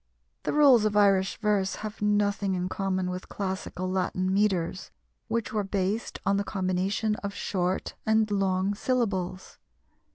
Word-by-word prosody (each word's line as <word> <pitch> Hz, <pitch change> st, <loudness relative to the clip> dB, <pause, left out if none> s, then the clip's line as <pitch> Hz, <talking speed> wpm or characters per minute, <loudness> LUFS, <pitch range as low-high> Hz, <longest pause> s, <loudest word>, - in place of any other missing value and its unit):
The -, -, +1 dB
rules 280 Hz, -7 st, +6 dB
of 210 Hz, -1 st, +1 dB
Irish 195 Hz, -2 st, +3 dB
verse 205 Hz, -3 st, +1 dB
have 215 Hz, 0 st, -7 dB
nothing 205 Hz, -1 st, +1 dB
in 180 Hz, 0 st, -2 dB
common 185 Hz, -1 st, -1 dB
with 180 Hz, 0 st, -6 dB
classical 190 Hz, -2 st, -4 dB
Latin 185 Hz, 0 st, 0 dB
metres, 190 Hz, -3 st, 0 dB, 0.4 s
which 230 Hz, -1 st, -2 dB
were 210 Hz, -1 st, +1 dB
based 195 Hz, +3 st, -2 dB
on 195 Hz, +1 st, +3 dB
the 200 Hz, -, 0 dB
combination 195 Hz, +2 st, -1 dB
of 200 Hz, 0 st, -5 dB
short 185 Hz, -1 st, -1 dB
and 220 Hz, -1 st, +2 dB
long 195 Hz, 0 st, +1 dB
syllables. 200 Hz, -6 st, -2 dB
195 Hz, 140 wpm, -27 LUFS, 185-210 Hz, 0.4 s, rules